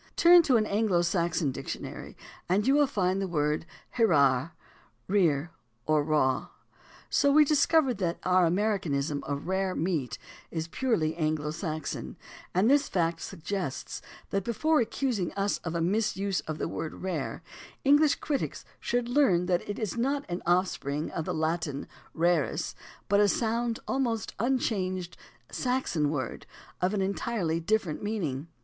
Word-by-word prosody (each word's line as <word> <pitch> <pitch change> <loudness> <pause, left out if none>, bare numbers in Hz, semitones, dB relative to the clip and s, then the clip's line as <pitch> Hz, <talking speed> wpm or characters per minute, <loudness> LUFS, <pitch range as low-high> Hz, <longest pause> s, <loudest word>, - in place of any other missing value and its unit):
Turn 345 0 +8
to 275 -7 +3
an 215 - +2
Anglo 200 -4 +2
Saxon 170 -3 0
dictionary - - -7 0.3
and 200 +4 +2
you 270 - +4
will 290 0 +4
find 190 -6 0
the 195 - -1
word, 150 -1 0 0.3
"Hrere 140 - +4 0.3
— - - -34
rear 170 -6 +2 0.3
or 155 -1 +3
raw." 145 -4 +1 0.6
So 285 - +4
we 300 +1 +6
discover 300 -2 +3
that 180 -5 -2
our 185 -1 +4
"Americanism" 165 -7 0
of 140 -1 -4
"rare" 190 +1 0
meat 150 -10 -1 0.3
is 160 -1 -3
purely 165 -7 0
Anglo 155 -2 -1
Saxon, 155 -1 -4 0.3
and 185 +5 +2
this 285 +2 +4
fact 165 -2 0
suggests 180 -3 -4 0.3
that 195 -1 0
before 300 +8 +2
accusing 230 -6 -1
us 200 0 0
of 170 -1 -5
a 170 - 0
misuse 200 +1 0
of 155 -1 -3
the - - -2
word 160 +1 -5
"rare" 170 -7 -3 0.4
English 290 +2 +5
critics 290 -3 -3
should 240 0 -1
learn 240 -10 +3
that 180 -1 +1
it 205 - -3
is 215 -2 -3
not 275 +4 0
an 175 0 -4
offspring 170 -5 0
of 160 - -3
the - - -2
Latin 160 -3 -2 0.3
"rarus," 170 -2 +1 0.3
but 200 0 +3
a 205 - +5
sound, 230 +2 0
almost 235 -6 -1
unchanged, 190 -7 -1 0.4
Saxon 250 - 0
word 140 -5 -4 0.3
of 185 +3 +1
an 195 - +1
en 195 +1 0
tirely 180 -9 -1
different 170 -2 0
meaning. 165 -10 -3
185 Hz, 150 wpm, -28 LUFS, 160-225 Hz, 0.6 s, Turn